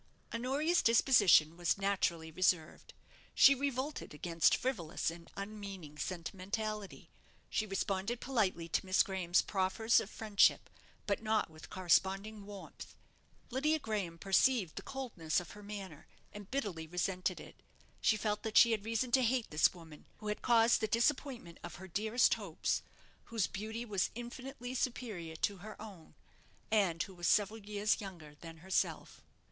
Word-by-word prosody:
Honoria's 275 Hz, +9 st, +1 dB
disposition 205 Hz, -, +5 dB
was 175 Hz, +2 st, +1 dB
naturally 180 Hz, -5 st, 0 dB
reserved. 180 Hz, -2 st, 0 dB, 0.4 s
She 275 Hz, -, +8 dB
revolted 275 Hz, -, -3 dB
against 165 Hz, +1 st, +3 dB
frivolous 175 Hz, -11 st, -2 dB
and 170 Hz, 0 st, -12 dB
unmeaning 195 Hz, -7 st, -7 dB
sentimentality. 200 Hz, +4 st, -4 dB, 0.4 s
She 215 Hz, -4 st, 0 dB
responded 195 Hz, +3 st, -2 dB
politely 200 Hz, -11 st, 0 dB
to 170 Hz, -, 0 dB
Miss 190 Hz, 0 st, +4 dB
Graham's 185 Hz, -2 st, +1 dB
proffers 200 Hz, +4 st, +2 dB
of -, -, -5 dB
friendship; 215 Hz, -3 st, +2 dB, 0.3 s
but 200 Hz, 0 st, 0 dB
not 215 Hz, -5 st, 0 dB
with 155 Hz, 0 st, -13 dB
corresponding 195 Hz, +3 st, +1 dB
warmth. 200 Hz, -2 st, -10 dB, 0.6 s
Lydia 300 Hz, +5 st, +2 dB
Graham 205 Hz, -, -3 dB
perceived 195 Hz, 0 st, +2 dB
the -, -, -5 dB
coldness 230 Hz, -13 st, -2 dB
of 175 Hz, -, -9 dB
her 210 Hz, -, -11 dB
manner, 195 Hz, -7 st, -8 dB, 0.3 s
and 205 Hz, -1 st, -10 dB
bitterly 195 Hz, -12 st, -3 dB
resented 180 Hz, +2 st, -1 dB
it. -, -, -12 dB, 0.4 s
She 215 Hz, -, +3 dB
felt 210 Hz, 0 st, -1 dB
that 220 Hz, -1 st, -1 dB
she 235 Hz, -, +8 dB
had 215 Hz, -3 st, 0 dB
reason 230 Hz, +2 st, -1 dB
to 260 Hz, -, +5 dB
hate 245 Hz, -1 st, 0 dB
this 150 Hz, 0 st, +4 dB
woman, 160 Hz, -4 st, -13 dB
who 210 Hz, -, -6 dB
had 210 Hz, -, -3 dB
caused 230 Hz, -1 st, +4 dB
the 220 Hz, -, +1 dB
disappointment 235 Hz, -, 0 dB
of -, -, -7 dB
her 190 Hz, +1 st, -10 dB
dearest 220 Hz, +6 st, +2 dB
hopes, 195 Hz, -7 st, -2 dB, 0.4 s
whose 225 Hz, -4 st, 0 dB
beauty 220 Hz, +4 st, -5 dB
was 200 Hz, -4 st, 0 dB
infinitely 245 Hz, +1 st, -7 dB
superior 220 Hz, -10 st, -3 dB
to 200 Hz, +5 st, -1 dB
her 215 Hz, +4 st, -10 dB
own; 200 Hz, -7 st, -11 dB, 0.6 s
and 185 Hz, -6 st, +2 dB
who 195 Hz, -, -10 dB
was 175 Hz, -1 st, -3 dB
several 210 Hz, +2 st, +2 dB
years 210 Hz, +1 st, 0 dB
younger 170 Hz, -7 st, -9 dB
than 165 Hz, -1 st, -10 dB
herself. 190 Hz, -, -1 dB
205 Hz, 150 wpm, -34 LUFS, 180-230 Hz, 0.6 s, She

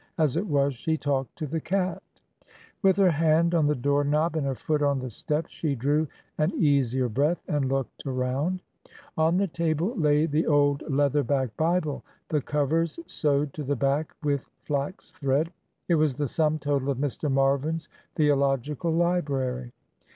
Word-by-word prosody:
As 155 Hz, -5 st, +2 dB
it 190 Hz, +5 st, -1 dB
was, 140 Hz, -3 st, +2 dB
she 160 Hz, +6 st, -1 dB
talked 135 Hz, -3 st, -2 dB
to 155 Hz, -, -4 dB
the 160 Hz, +3 st, -3 dB
cat. 185 Hz, +1 st, -1 dB, 0.8 s
With 190 Hz, -2 st, +4 dB
her 190 Hz, -3 st, +5 dB
hand 165 Hz, +2 st, +3 dB
on 160 Hz, -3 st, +3 dB
the 150 Hz, -, +2 dB
door 145 Hz, +3 st, +1 dB
knob 150 Hz, +4 st, +1 dB
and 150 Hz, -3 st, 0 dB
her 135 Hz, -, -1 dB
foot 150 Hz, +3 st, -1 dB
on 140 Hz, -1 st, +2 dB
the 130 Hz, -2 st, -5 dB
step, 150 Hz, +8 st, -2 dB
she 150 Hz, -4 st, -2 dB
drew 145 Hz, +5 st, +1 dB, 0.3 s
an 155 Hz, +3 st, +2 dB
easier 130 Hz, -4 st, +2 dB
breath 145 Hz, +9 st, 0 dB
and 145 Hz, -3 st, 0 dB
looked 135 Hz, 0 st, -3 dB
around. 135 Hz, +8 st, -1 dB, 0.5 s
On 160 Hz, +2 st, +3 dB
the 200 Hz, -, +2 dB
table 170 Hz, -, -1 dB
lay 150 Hz, -4 st, +3 dB
the 155 Hz, 0 st, 0 dB
old 145 Hz, -1 st, +3 dB
leather 145 Hz, +1 st, +2 dB
back 130 Hz, -3 st, -1 dB
Bible, 160 Hz, -2 st, 0 dB, 0.3 s
the 150 Hz, -2 st, +1 dB
covers 150 Hz, +4 st, 0 dB
sewed 145 Hz, -, 0 dB
to 150 Hz, -, -5 dB
the 145 Hz, +1 st, 0 dB
back 140 Hz, +4 st, 0 dB
with 145 Hz, -3 st, -1 dB
flax 145 Hz, +5 st, -3 dB
thread. 140 Hz, +4 st, 0 dB, 0.4 s
It 175 Hz, -, +2 dB
was 155 Hz, -4 st, +2 dB
the 145 Hz, +1 st, -1 dB
sum 155 Hz, +2 st, +1 dB
total 140 Hz, -2 st, -1 dB
of 135 Hz, -, 0 dB
Mr. 145 Hz, +1 st, -2 dB
Marvin's 140 Hz, +4 st, +1 dB, 0.3 s
theological 145 Hz, +1 st, +1 dB
library. 140 Hz, -8 st, 0 dB
145 Hz, 170 wpm, -26 LUFS, 140-160 Hz, 0.8 s, her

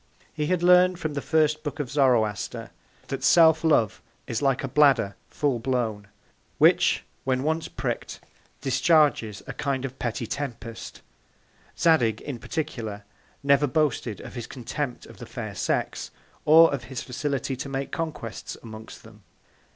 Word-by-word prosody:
He 150 Hz, -1 st, -2 dB
had 180 Hz, 0 st, 0 dB
learned 180 Hz, 0 st, +6 dB
from 155 Hz, -3 st, -3 dB
the 140 Hz, -, -3 dB
first 155 Hz, 0 st, +2 dB
Book 145 Hz, 0 st, -5 dB
of 140 Hz, -3 st, -3 dB
Zoroaster, 120 Hz, -8 st, +1 dB, 0.4 s
that -, -, -4 dB
Self 160 Hz, -2 st, +6 dB
love 145 Hz, -10 st, +2 dB, 0.2 s
is 115 Hz, -, -3 dB
like 135 Hz, -2 st, +1 dB
a -, -, -1 dB
Bladder 135 Hz, -7 st, +3 dB
full 140 Hz, -5 st, 0 dB
blown, 115 Hz, -5 st, -2 dB, 0.5 s
which -, -, +4 dB, 0.2 s
when 130 Hz, 0 st, 0 dB
once 160 Hz, +2 st, -1 dB
prick'd, -, -, -4 dB, 0.4 s
discharges 140 Hz, -, +2 dB
a -, -, -6 dB
kind 135 Hz, -2 st, -2 dB
of 135 Hz, 0 st, -8 dB
petty 120 Hz, 0 st, -2 dB
Tempest. 115 Hz, -3 st, -6 dB, 0.8 s
Zadig, 125 Hz, -11 st, +3 dB
in 135 Hz, -5 st, -6 dB
particular, 110 Hz, -9 st, -4 dB, 0.4 s
never 140 Hz, +1 st, +4 dB
boasted 140 Hz, -, 0 dB
of -, -, -10 dB
his 120 Hz, -2 st, -6 dB
Contempt 130 Hz, +1 st, -5 dB
of -, -, -14 dB
the -, -, -9 dB
Fair -, -, -6 dB
Sex, -, -, -2 dB, 0.4 s
or 160 Hz, +1 st, +7 dB
of 125 Hz, -4 st, -4 dB
his 130 Hz, +1 st, -6 dB
Facility 135 Hz, +1 st, -2 dB
to 140 Hz, +2 st, -6 dB
make 135 Hz, 0 st, -3 dB
Conquests 155 Hz, -9 st, -5 dB
amongst 110 Hz, -1 st, -10 dB
them. 110 Hz, -1 st, -16 dB
135 Hz, 150 wpm, -25 LUFS, 115-150 Hz, 0.8 s, or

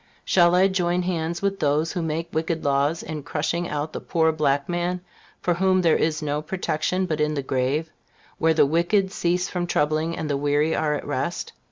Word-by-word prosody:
Shall 175 Hz, -1 st, +4 dB
I 185 Hz, +2 st, +5 dB
join 180 Hz, -2 st, 0 dB
hands 170 Hz, 0 st, -2 dB
with 195 Hz, 0 st, 0 dB
those 150 Hz, +3 st, +1 dB
who 175 Hz, -, -2 dB
make 165 Hz, +1 st, -3 dB
wicked 160 Hz, +1 st, -1 dB
laws, 140 Hz, +3 st, +1 dB
in 155 Hz, -2 st, -5 dB
crushing 165 Hz, +4 st, -2 dB
out 150 Hz, +1 st, -3 dB
the -, -, -4 dB
poor 160 Hz, -1 st, +1 dB
black 145 Hz, -3 st, +1 dB
man, 175 Hz, +1 st, -1 dB, 0.4 s
for 175 Hz, -, +1 dB
whom 185 Hz, +1 st, +2 dB
there 165 Hz, -2 st, +4 dB
is 160 Hz, 0 st, 0 dB
no 150 Hz, 0 st, -1 dB
protection 180 Hz, +2 st, -1 dB
but 155 Hz, -4 st, -2 dB
in 150 Hz, 0 st, +1 dB
the 140 Hz, -, -2 dB
grave, 135 Hz, +5 st, -1 dB, 0.5 s
where 160 Hz, 0 st, +3 dB
the 155 Hz, -, +5 dB
wicked 175 Hz, +6 st, +1 dB
cease 180 Hz, +1 st, 0 dB
from 175 Hz, -1 st, -3 dB
troubling, 155 Hz, +1 st, 0 dB
and 155 Hz, -, -3 dB
the 145 Hz, -2 st, 0 dB
weary 145 Hz, +2 st, +1 dB
are 150 Hz, -1 st, +1 dB
at -, -, -5 dB
rest? -, -, -3 dB
160 Hz, 200 wpm, -24 LUFS, 150-175 Hz, 0.5 s, I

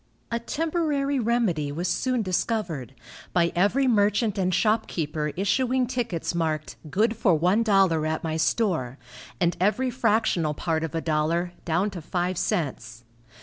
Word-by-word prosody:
A 235 Hz, -, 0 dB
temporary 295 Hz, 0 st, -1 dB
remedy 215 Hz, -11 st, 0 dB
was 170 Hz, +5 st, -2 dB
soon 255 Hz, +1 st, 0 dB
discovered, 180 Hz, -, -2 dB, 0.4 s
by 170 Hz, -1 st, +2 dB
every 205 Hz, +10 st, +3 dB
merchant 210 Hz, -1 st, +2 dB
and 185 Hz, -2 st, 0 dB
shopkeeper 165 Hz, -7 st, 0 dB
issuing 250 Hz, +6 st, +1 dB
tickets 235 Hz, -11 st, -2 dB
marked 160 Hz, -2 st, -2 dB
"Good 220 Hz, +8 st, +1 dB
for 200 Hz, -6 st, +3 dB
one 180 Hz, +8 st, +2 dB
dollar 190 Hz, -8 st, +3 dB
at 160 Hz, 0 st, -2 dB
my 160 Hz, -1 st, -2 dB
store," 160 Hz, -, 0 dB, 0.4 s
and 175 Hz, -1 st, +2 dB
every 250 Hz, +7 st, +2 dB
fractional 215 Hz, -, +1 dB
part 160 Hz, +1 st, -1 dB
of 165 Hz, 0 st, -4 dB
a 165 Hz, -, 0 dB
dollar, 165 Hz, +3 st, 0 dB
down 180 Hz, +5 st, +1 dB
to 180 Hz, -3 st, -7 dB
five 175 Hz, +2 st, -2 dB
cents. 120 Hz, -7 st, -2 dB
185 Hz, 145 wpm, -25 LUFS, 160-230 Hz, 0.4 s, every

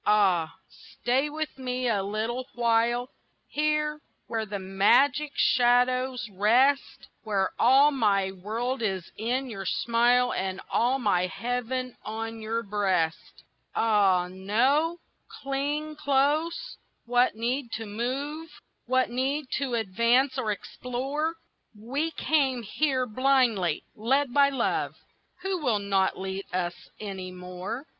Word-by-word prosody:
Ah, 190 Hz, -6 st, +3 dB, 0.5 s
stay 265 Hz, +4 st, +2 dB
with 305 Hz, -2 st, -5 dB
me 255 Hz, -1 st, -2 dB
a 210 Hz, -4 st, +1 dB
little 220 Hz, +6 st, -3 dB
while 240 Hz, +1 st, +1 dB, 0.4 s
Here, 300 Hz, 0 st, 0 dB, 0.2 s
where 220 Hz, -1 st, -3 dB
the 205 Hz, 0 st, -4 dB
magic 245 Hz, +10 st, +3 dB
shadows 250 Hz, 0 st, +2 dB
rest, 245 Hz, +8 st, +2 dB, 0.2 s
Where 200 Hz, -3 st, 0 dB
all 270 Hz, +4 st, +6 dB
my 200 Hz, -7 st, +2 dB
world 230 Hz, +7 st, -3 dB
is 190 Hz, -5 st, -2 dB
in 250 Hz, +5 st, -1 dB
your 195 Hz, -5 st, -6 dB
smile 240 Hz, +2 st, +2 dB
And 190 Hz, 0 st, -2 dB
all 250 Hz, +3 st, +2 dB
my 190 Hz, -7 st, +1 dB
heaven 250 Hz, +4 st, -3 dB
on 225 Hz, +1 st, -5 dB
your 225 Hz, +1 st, -2 dB
breast. 190 Hz, -6 st, -1 dB, 0.3 s
Ah 195 Hz, -5 st, +3 dB
no! 250 Hz, -, +1 dB, 0.3 s
cling 290 Hz, +3 st, -3 dB
close, 300 Hz, +3 st, 0 dB, 0.3 s
what 245 Hz, 0 st, +2 dB
need 240 Hz, +2 st, -2 dB
to 225 Hz, -, -4 dB
move, 275 Hz, +9 st, -4 dB, 0.4 s
What 255 Hz, -1 st, +2 dB
need 265 Hz, +3 st, -1 dB
to 265 Hz, -4 st, -1 dB
advance 235 Hz, +5 st, +2 dB
or 215 Hz, -, -1 dB
explore? 270 Hz, +9 st, -3 dB, 0.4 s
We 275 Hz, +9 st, -2 dB
came 275 Hz, -6 st, +1 dB
here 260 Hz, +3 st, 0 dB
blindly, 240 Hz, -, +2 dB
led 260 Hz, +4 st, +1 dB
by 280 Hz, -1 st, +5 dB
love, 265 Hz, -4 st, -1 dB, 0.5 s
Who 380 Hz, -3 st, -1 dB
will 245 Hz, -7 st, +2 dB
not 195 Hz, -2 st, 0 dB
lead 190 Hz, +1 st, -4 dB
us 180 Hz, -1 st, -1 dB, 0.3 s
any 195 Hz, -3 st, -6 dB
more. 180 Hz, +7 st, -6 dB
240 Hz, 120 wpm, -27 LUFS, 205-270 Hz, 0.5 s, all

